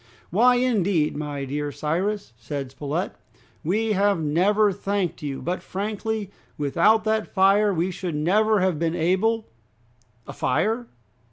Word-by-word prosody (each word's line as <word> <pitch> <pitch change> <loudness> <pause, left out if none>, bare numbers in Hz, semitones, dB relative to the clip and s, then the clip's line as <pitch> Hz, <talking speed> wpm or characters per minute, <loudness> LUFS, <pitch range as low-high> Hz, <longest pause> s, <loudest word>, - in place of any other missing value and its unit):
"Why, 245 +7 +5
indeed, 200 -11 +1
my 145 -2 -4
dear 145 +2 -3
Cyrus," 180 - -2
said 130 +4 -5
Spilett, 145 +6 -3 0.5
"we 215 +7 0
have 200 -2 +2
never 195 +7 +3
thanked 195 -2 -2
you; 140 -3 -4
but 180 +2 -2
frankly, 210 +1 -3 0.3
without 170 +10 +3
that 220 0 0
fire 200 +2 +4
we 180 0 0
should 175 -2 -4
never 205 +7 +2
have 185 -5 +1
been 165 0 0
able 190 +7 +1 0.4
" 115 -1 -36
"A - - -7
fire?" 220 - 0
185 Hz, 140 wpm, -24 LUFS, 150-210 Hz, 0.5 s, Why